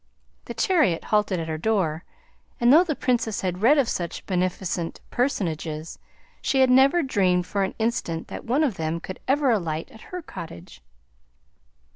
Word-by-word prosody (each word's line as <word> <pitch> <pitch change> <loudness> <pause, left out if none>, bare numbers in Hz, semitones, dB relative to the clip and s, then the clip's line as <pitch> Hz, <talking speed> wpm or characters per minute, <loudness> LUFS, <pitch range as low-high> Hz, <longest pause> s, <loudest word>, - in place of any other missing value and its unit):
The - - -7
chariot 310 - +2
halted 210 -4 +1
at 165 - -4
her 155 -1 -3
door, 180 -5 0 0.6
and 240 +1 +5
though 330 +4 +8
the 315 -5 -2
Princess 235 -5 0
had 185 0 -3
read 270 +7 +5
of 275 -4 +3
such 175 -6 -4
beneficent 180 -2 -2
personages, 165 - -2 0.4
she 265 -1 +3
never 265 +6 +5
dreamed 185 -8 +2
for 200 +2 -2
an 190 - -1
instant 220 -8 -2
that - - -7
one 265 +7 +1
of 255 -10 0
them 160 +1 -2
could 185 +2 -8
ever 275 -1 +3
alight 165 -7 -2
at 220 - -14
her 360 -1 -6
cottage. 125 - -10
200 Hz, 160 wpm, -24 LUFS, 170-260 Hz, 0.6 s, though